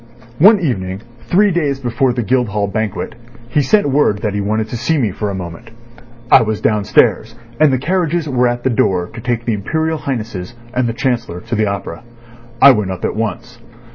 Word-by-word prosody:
One 205 +6 +7
evening, 95 - -2 0.3
three 205 +3 +3
days 145 -6 0
before 125 0 0
the 120 -1 -2
Guildhall 105 -3 0
Banquet, 105 0 -3 0.4
he 145 +4 +2
sent 205 - +2
word 130 -7 +2
that 105 -3 -1
he 100 - -1
wanted 110 +2 -1
to - - -5
see 120 +8 0
me 115 -8 0
for 105 +2 -3
a 100 - -3
moment. 90 +5 -8 0.6
I - - +8
was 110 -2 -1
downstairs, 110 +1 +2 0.2
and 155 -2 +5
the 130 - +2
carriages 170 +2 -1
were 125 -3 +2
at 120 0 -2
the 130 - +1
door 90 -5 +1
to 115 - -8
take 120 -1 -2
the 115 - 0
Imperial 160 +10 -2
Highnesses 115 -6 -5 0.2
and 125 -1 0
the - - -2
Chancellor 120 -8 -2
to - - -8
the 110 -1 +1
opera. 100 -4 -5 0.6
I 140 - +9
went 105 -6 0
up 95 -1 -4
at - - -2
once. 115 +3 -4
120 Hz, 200 wpm, -16 LUFS, 105-135 Hz, 0.6 s, I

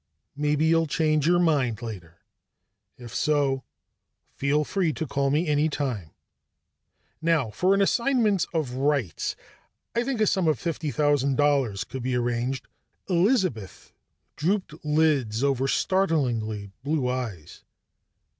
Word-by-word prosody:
"Maybe 150 +1 +1
you'll 165 0 +3
change 155 0 +1
your 175 +1 +4
mind 140 -10 +1
later. 90 -7 -8 0.8
If 120 -2 -10
so, 140 -3 +1 0.7
feel 145 +2 +1
free 170 0 0
to 160 - -3
call 140 0 -1
on 135 - +1
me 155 +4 +2
anytime. 145 - -1 1.1
Now, 160 -8 +1
for 185 - +2
an 200 - +3
assignment 225 -5 +2
of 155 -7 -1
rights, 130 - -1 0.6
I 235 - +2
think 260 -2 -2
a 215 - +4
sum 190 -4 +1
of 155 -4 +2
fifty 160 +3 -3
thousand 145 -2 +1
dollars 140 -9 +2
could 130 - -7
be 125 +1 -1
arranged 120 +1 -1 0.2
" - - -34
Elizabeth 180 - 0 0.4
drooped 170 -1 -2
lids 150 -7 +1
over 135 -1 +1
startlingly 125 - 0
blue 145 -2 0
eyes. 115 -11 -5
145 Hz, 130 wpm, -26 LUFS, 125-165 Hz, 1.1 s, your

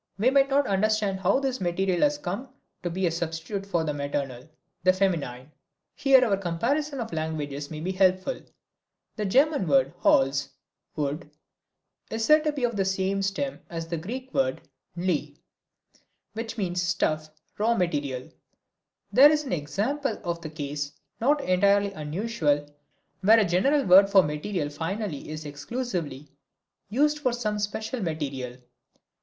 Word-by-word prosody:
We 230 +6 +3
might 275 0 +4
not 280 +1 +3
understand 205 0 +1
how 190 +7 +3
this 265 -4 -2
material 180 +1 0
has 295 0 +3
come 225 +2 -5 0.3
to 175 - -2
be 185 +2 -1
a 170 - +2
substitute 170 +4 -4
for 170 -5 0
the 150 -2 -1
maternal, 140 -2 -4 0.3
the 185 0 +5
feminine. 155 -9 -1 0.4
Here 265 -2 +5
our 200 -4 +2
comparison 260 - -1
of 225 -6 -5
languages 150 -3 -3
may 155 -1 -6
be 180 +3 -2
helpful. 185 +5 +1 0.7
The 210 - -2
German 275 - +3
word 135 0 +3
Holz 135 +1 +3 0.5
(wood) 150 +1 -3 0.8
is 225 0 -1
said 305 +3 +6
to 305 - +2
be 285 -3 -5
from 235 -2 +1
the 195 - +2
same 190 +1 0
stem 200 +8 -2
as 165 -1 -4
the 170 - -2
Greek 250 +10 -6
word, 130 0 +1 0.4
νλη, 175 -3 -1 1.0
which 225 +1 -5
means 180 -3 -1
stuff, 155 -4 0 0.3
raw 230 +3 +3
material. 145 - -1 0.9
This 295 +3 +7
is - - -10
an 265 - -3
example 215 - -2
of 170 -2 -3
the 155 - -6
case, 145 -1 -4 0.3
not 285 +5 +3
entirely 200 +2 +3
unusual, 155 -2 -1 0.6
where 220 +4 +6
a 215 - +3
general 235 - +2
word 195 +2 +7
for 195 -2 +6
material 150 +1 -2
finally 165 +1 -4
is 155 0 -6
exclusively 150 - -4 0.6
used 295 +7 +2
for 255 -4 +1
some 215 -3 -2
special 220 +4 -3
material. 140 -7 -3
190 Hz, 150 wpm, -26 LUFS, 155-230 Hz, 1.0 s, This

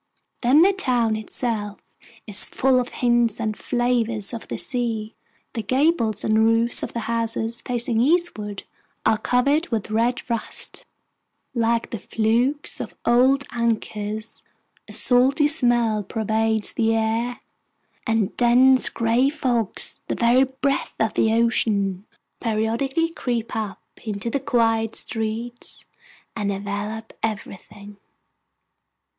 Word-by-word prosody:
Then 270 +6 +5
the 395 +2 +4
town 245 - +1
itself 215 -1 -3 0.5
is 210 -2 -2
full 260 -1 +2
of 245 - -2
hints 240 -3 +1
and 215 -1 -2
flavors 235 -3 0
of 230 - -7
the - - -4
sea. 230 -4 -1 0.4
The 225 - -2
gables 255 - +1
and 220 0 +2
roofs 230 +1 +3
of - - -5
the 235 - -3
houses 230 0 -1
facing 235 -2 -1
eastward 245 - 0 0.4
are 220 - +3
covered 280 +9 +1
with 220 -2 -3
red 235 +4 0
rust, 230 -3 -3 0.7
like 235 -1 0
the 230 - -4
flukes 235 +9 0
of - - -6
old 260 +3 +4
anchors; 220 -2 -3 0.5
a - - -10
salty 265 +4 +3
smell 240 -7 +2
pervades 220 +1 -1
the 225 -1 +1
air, 225 +2 -1 0.7
and 225 -3 0
dense 255 +2 +5
gray 235 +4 +2
fogs, 245 -8 -2
the - - -1
very 245 +3 +4 0.2
breath 275 0 0
of 220 -1 +1
Ocean, 220 -4 +1 0.3
periodically 235 +8 0
creep 240 -6 -3
up 210 -4 -4 0.2
into 215 +1 -3
the 280 - 0
quiet 225 -3 +1
streets 225 +2 -4 0.5
and 205 -3 -1
envelop 205 +3 -5
everything. 205 -1 -6
230 Hz, 120 wpm, -23 LUFS, 220-245 Hz, 0.7 s, Then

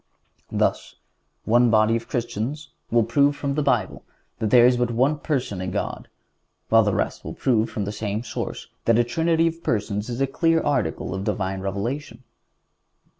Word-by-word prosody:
Thus, - - -1 0.5
one 120 +2 +4
body 110 0 +4
of 115 0 -4
Christians 120 +5 -3 0.2
will 115 0 +3
prove 140 +6 +2
from 140 -1 -2
the 150 - 0
Bible 140 - 0 0.4
that 110 - 0
there 120 +1 +7
is 125 0 +5
but 120 0 0
one 130 +6 +1
Person 130 - -2
in 95 - -3
God, - - -4 0.6
while 115 0 +6
the 105 -2 +1
rest - - -2
will - - -7
prove 115 -3 +1
from 105 -2 -3
the 105 - -3
same 105 +1 -3
source 120 - -5 0.2
that 115 -1 +4
a 120 - +4
Trinity 165 +6 +1
of 165 0 -2
Persons 105 -2 -2
is 120 +1 -4
a 135 - +3
clear 165 +4 +2
article 130 - -1
of 95 0 -3
Divine 95 -1 -2
Revelation. 115 +6 -4
120 Hz, 175 wpm, -23 LUFS, 110-140 Hz, 0.6 s, there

